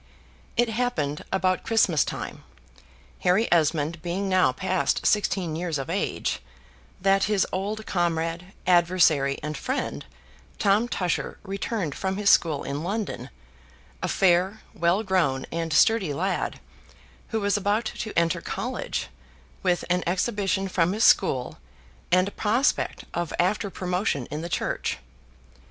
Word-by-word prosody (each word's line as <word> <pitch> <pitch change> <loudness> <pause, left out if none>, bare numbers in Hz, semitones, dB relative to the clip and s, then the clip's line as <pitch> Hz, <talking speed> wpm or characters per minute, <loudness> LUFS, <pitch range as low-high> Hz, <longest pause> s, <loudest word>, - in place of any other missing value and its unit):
It 240 - +4
happened 220 -11 -1
about 185 -1 +1
Christmas 225 -1 +3
time, - - -6 0.8
Harry 190 +5 +3
Esmond 160 -1 +2
being 185 +3 -2
now 185 -7 +4
past 140 +2 0
sixteen 185 -5 +1
years 165 -2 -2
of 135 - -4
age, - - -1 0.6
that 195 +1 +3
his 210 -2 +2
old 210 +3 -3
comrade, 170 0 -1
adversary, 170 -6 +4
and 150 0 -3
friend, - - -3 0.5
Tom 205 +4 +3
Tusher, 180 -7 -2
returned 195 -4 -3
from 190 0 -2
his 205 -1 +4
school 155 -4 +3
in 140 +2 -3
London, 205 +4 -3 0.7
a - - -1
fair, 190 +3 +2
well 175 +5 +1
grown, 170 -10 +1
and 165 -1 -2
sturdy 180 0 +3
lad, 185 +3 -1 0.7
who 225 - -1
was 205 -1 +1
about 205 +3 +1
to 215 0 -4
enter 170 -1 +2
college, - - -3 0.5
with 175 -1 +1
an 180 0 +1
exhibition 195 +1 0
from 180 -1 +1
his 220 +2 0
school, 130 -10 +3 0.5
and 185 +1 +4
a - - -16
prospect 235 +8 0
of 175 -2 -2
after 200 +3 +1
promotion 180 - -1
in 150 - -3
the 170 - -5
church. - - -2
185 Hz, 135 wpm, -25 LUFS, 165-200 Hz, 0.8 s, It